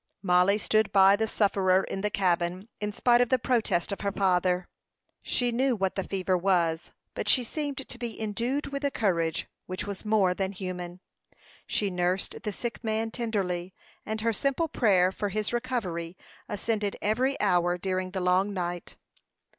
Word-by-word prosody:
Mollie 180 +2 +4
stood 215 0 +1
by 195 0 +7
the 220 +2 0
sufferer 195 -3 +2
in 195 - -4
the 210 - 0
cabin, 180 0 0
in 210 0 -2
spite 240 +3 +3
of 245 - +2
the 260 - +4
protest 230 -8 0
of 200 - -4
her 200 - 0
father. 180 -2 +1 0.5
She 245 -1 +1
knew 255 +2 +2
what 190 -3 0
the 195 - -2
fever 185 -1 -1
was; 175 -3 +1 0.2
but - - -4
she 255 - +5
seemed 280 +1 -4
to 250 - -7
be 240 -2 -5
endued 235 +7 -2
with 280 0 -4
a 285 - +2
courage 170 - 0 0.2
which 185 +2 -4
was 200 -2 -6
more 210 -4 +3
than 190 +1 -2
human. 180 -1 -6 0.7
She 205 -2 0
nursed 180 +1 -1
the 210 - -3
sick 235 +4 -5
man 220 0 -1
tenderly, 190 -7 -2 0.3
and 220 0 -3
her 230 0 +1
simple 275 +8 0
prayer 190 - +3
for 205 +1 -3
his 215 +3 -2
recovery 185 -9 -3 0.3
ascended 205 0 -2
every 255 +6 0
hour 175 -3 +2
during 185 0 -2
the 190 0 -3
long 185 +3 +2
night. 175 -1 -4
200 Hz, 170 wpm, -28 LUFS, 180-225 Hz, 0.7 s, by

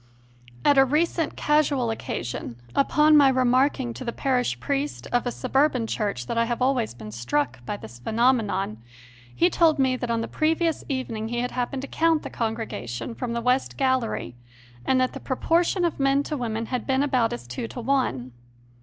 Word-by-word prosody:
At 285 -1 +6
a - - +8
recent 310 +3 0
casual 295 -5 +2
occa 225 - -4
sion, 120 0 -5 0.2
upon 300 +2 +4
my 285 -2 +7
remarking 255 0 +2
to 260 - -7
the 235 - -2
parish 250 0 0
priest 280 +1 -2
of 245 0 +1
a - - 0
suburban 255 -1 +1
church 205 - -2
that 230 - -1
I 230 - +3
have 240 0 -2
always 255 - +1
been 110 -2 -9
struck 120 +2 -2
by 205 - -3
this 120 - -11
phenomenon, 220 - +1 0.6
he 170 - +4
told 315 - +3
me 260 -2 +2
that 245 -1 -4
on 230 -1 0
the - - -3
previous 325 +1 0
evening 230 -5 -3
he 240 +1 -2
had 250 - -2
happened 255 +2 -3
to - - -5
count 325 0 +2
the - - -7
congrega 225 - -3
tion 120 - -5
from 235 0 -4
the 235 - -2
west 250 +2 0
gallery 260 - 0 0.5
and 260 - +3
that 255 0 +1
the - - -6
proportion 340 +7 +1
of 335 - -2
men 275 +1 +3
to 300 - -4
women 230 -4 -3
had 250 - -2
been 265 0 +2
about 255 -5 +1
as 120 0 -6
two 120 - -5
to 245 - -8
one. 235 - 0
250 Hz, 195 wpm, -25 LUFS, 225-275 Hz, 0.6 s, a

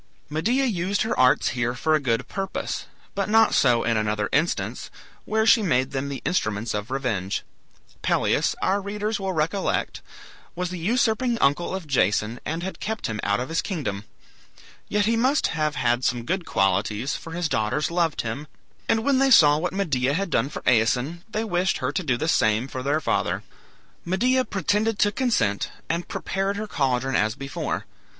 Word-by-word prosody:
Medea 235 - +1
used 195 -3 0
her 220 - -1
arts 130 0 +4
here 120 0 -1
for 155 +5 +1
a 155 - +4
good 125 -2 -1
purpose, 195 -1 -4 0.3
but 200 0 -2
not 225 +1 +5
so 120 -3 +4
in 115 -1 +1
another 105 -1 -1
instance, 155 +4 -1 0.4
where 220 0 +1
she 225 +1 +6
made 130 -9 +1
them 140 +1 -3
the 140 - -6
instruments 110 - -1
of 105 +2 -4
revenge. 115 -8 -2 0.6
Pelias, - - +1
our 200 +2 +2
readers 210 +2 -3
will 195 -1 -2
recollect, 165 +5 -1 0.5
was 180 0 -3
the 180 - -5
usurping 235 +5 +1
uncle 160 +3 +1
of 190 -3 -5
Jason, 115 -4 +1
and 165 +3 -3
had 190 - -5
kept 220 0 -3
him 110 -1 -3
out 100 0 +1
of 125 - -4
his 165 - 0
kingdom. 115 - -4 0.8
Yet 205 0 +2
he 230 +2 +2
must 260 +5 +2
have 155 -2 0
had 120 +1 +1
some 120 -1 0
good 180 +2 -1
qualities, 105 +6 0
for 165 - -8
his 175 -1 -1
daughters 110 +7 0
loved 170 -3 +1
him, 120 +7 -5 0.4
and 220 0 +2
when 275 0 +3
they 270 0 +4
saw 150 - +7
what 180 +2 -1
Medea 145 -9 0
had 195 0 -2
done 125 +1 +1
for - - -7
Aeson, 125 +8 +2
they 220 +1 -2
wished 185 -3 0
her 130 -1 -2
to 185 - -1
do 130 -8 0
the 155 - -2
same 110 -5 +2
for 130 -1 -5
their 145 +4 0
father. - - 0 0.6
Medea 250 +8 +2
pretended 210 +1 0
to 205 - +3
consent, 200 - 0 0.2
and 170 +1 -2
prepared 195 +1 -2
her 215 - -3
caldron 135 - 0
as 110 +2 +1
before. 140 0 -4
155 Hz, 180 wpm, -24 LUFS, 125-200 Hz, 0.8 s, saw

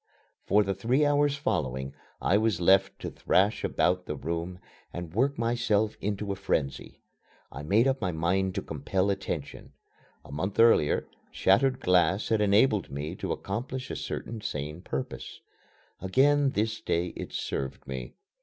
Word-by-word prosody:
For 105 +1 +4
the 95 -1 -1
three 120 +10 +1
hours 145 0 +3
following 65 - -2 0.3
I 95 - +2
was 110 -4 +2
left 95 +2 +4
to - - -4
thrash 100 +3 +1
about 90 +1 +1
the 75 - -3
room 85 +5 -4 0.3
and 85 -2 -7
work 135 +7 +1
myself 115 -2 +1
into 100 0 -2
a - - -2
frenzy. 70 -8 -3 0.5
I 70 - -7
made 105 - +3
up 135 -1 0
my 90 -3 0
mind 90 +4 0
to - - -2
compel 95 +1 -1
attention. 95 -7 -5 0.5
A - - -12
month 95 +9 -3
earlier, 115 -10 +4 0.2
shattered 130 +7 +2
glass 90 +3 +2
had 110 -1 +2
enabled 105 0 +3
me 75 +4 -4
to - - -3
accomplish 125 +6 -4
a - - -3
certain 115 -2 -5
sane 75 -3 -4
purpose. - - -5 0.6
Again 140 +9 +3
this 110 +1 -1
day 85 +1 0
it - - -6
served 65 -1 -4
me. 65 -1 -6
95 Hz, 155 wpm, -28 LUFS, 85-115 Hz, 0.6 s, For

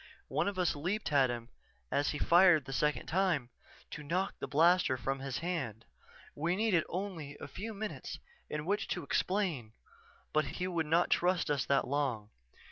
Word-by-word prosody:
One - - 0
of 200 -2 -2
us 180 -4 +1
leaped 180 +6 -2
at 135 -3 +4
him 120 -1 -5 0.4
as 145 - +2
he 145 - -2
fired 170 -3 +5
the 135 - -6
second 150 -1 +1
time, 170 -8 +1 0.4
to 150 - -6
knock 180 +6 -1
the - - -4
blaster 165 -2 +4
from 135 +2 -2
his 135 -1 -3
hand. 135 - -3 0.5
We 170 +4 0
needed 200 -6 +2
only 170 -6 -5
a - - -7
few 220 +4 -6
minutes 215 +1 -5 0.3
in 150 0 -3
which 200 +1 0
to 180 - -3
explain 160 - -1 0.6
but 155 0 +3
he 180 - -1
would 170 -4 -1
not 165 +3 +3
trust 180 -3 +2
us 140 -2 0
that 140 -1 +2
long. 125 -7 -1
160 Hz, 175 wpm, -33 LUFS, 140-185 Hz, 0.6 s, fired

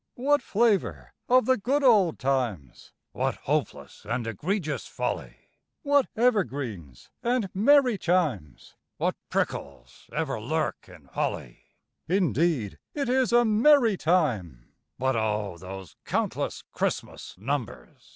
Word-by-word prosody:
_) - - -55
What 285 +3 +2
flavour 175 - 0 0.2
of 255 +1 +5
the 260 -1 +3
good 270 +7 0
old 205 - +5
times! 120 - -2 0.2
(What - - -1
hopeless - - -3
and 120 - -2
egregious 155 - -2
folly!) - - -4 0.5
What 285 -2 +3
evergreens 130 - -1
and 235 -5 0
merry 250 +1 +4
chimes! 150 - -1 0.2
(What - - 0
prickles 65 -3 -4
ever 150 -7 -2
lurk 155 +7 -2
in - - -15
holly!) - - -4 0.5
Indeed 165 - +1 0.2
it 280 -4 -1
is 255 -1 +2
a 240 0 +5
merry 230 +1 +5
time; 120 - 0 0.3
(_But 130 +1 +1
O! 105 -5 -1
those 95 -1 -9
countless - - -2
Christmas - - -3
numbers! 110 - -5
160 Hz, 120 wpm, -27 LUFS, -, 0.5 s, of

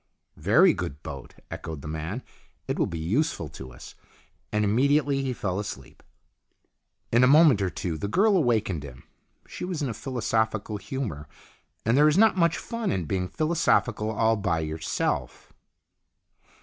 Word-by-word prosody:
" - - -50 0.2
Very 175 - +7
good 85 -4 -6
boat," 70 -4 -8 0.2
echoed 80 -3 -6
the - - -6
man. 80 +10 -4 0.2
" - - -39
It - - -2
will - - +2
be 85 - -5
useful 90 - -1
to 65 -1 -10
us." 65 - -12 0.6
And 105 0 +1
immediately 140 +6 +2
he 135 -1 -2
fell 100 -5 -2
asleep. 70 -11 -8 1.1
In 120 +2 +4
a - - +7
moment 145 -6 +6
or 95 - +1
two 85 -3 -4
the 100 - -2
girl 200 - +3
awakened 110 - +1
him. 70 -4 -11 0.4
She - - -8
was 180 -4 -3
in 135 - -1
a - - -3
philosophical 110 -3 -1
humour, 105 - -5 0.6
and 115 +2 +3
there 150 +2 +6
is 155 - +3
not 220 0 +5
much 170 -3 +2
fun 230 -2 -3
in 90 -3 -1
being 90 +3 -1
philosophical 155 - +1
all 110 +1 +2
by 90 -5 0
yourself. 80 0 -3
110 Hz, 165 wpm, -26 LUFS, -, 1.1 s, Very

